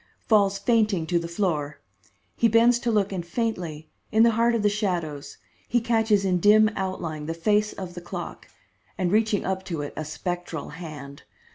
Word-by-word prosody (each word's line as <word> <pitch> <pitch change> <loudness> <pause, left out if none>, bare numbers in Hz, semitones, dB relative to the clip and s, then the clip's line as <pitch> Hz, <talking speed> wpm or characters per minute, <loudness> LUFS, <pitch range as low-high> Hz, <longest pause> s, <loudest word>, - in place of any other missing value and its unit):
falls 200 -3 +3
fainting 210 -4 +1
to 170 +1 +1
the 170 - -5
floor. 155 -5 -2 0.6
He 230 - +3
bends 230 +2 +4
to 240 - -2
look 205 -2 +1
and 185 -3 -3
faintly, 170 -6 -4 0.2
in 220 +1 +5
the 235 - +5
heart 230 +1 +2
of 220 - -1
the - - +4
shadows, 175 -9 -2 0.3
he 240 - +3
catches 225 -3 +2
in 180 -2 +2
dim 215 +3 +5
outline 165 -5 -4
the 165 - -3
face 210 +5 +1
of 185 -2 -7
the 175 - -8
clock, 175 - -7 0.5
and 180 -2 0
reaching 215 -1 +2
up 190 0 -2
to 165 -5 -3
it 145 - -6
a 155 - -3
spectral 175 0 -5
hand. 150 -4 -9
190 Hz, 180 wpm, -25 LUFS, 165-215 Hz, 0.6 s, in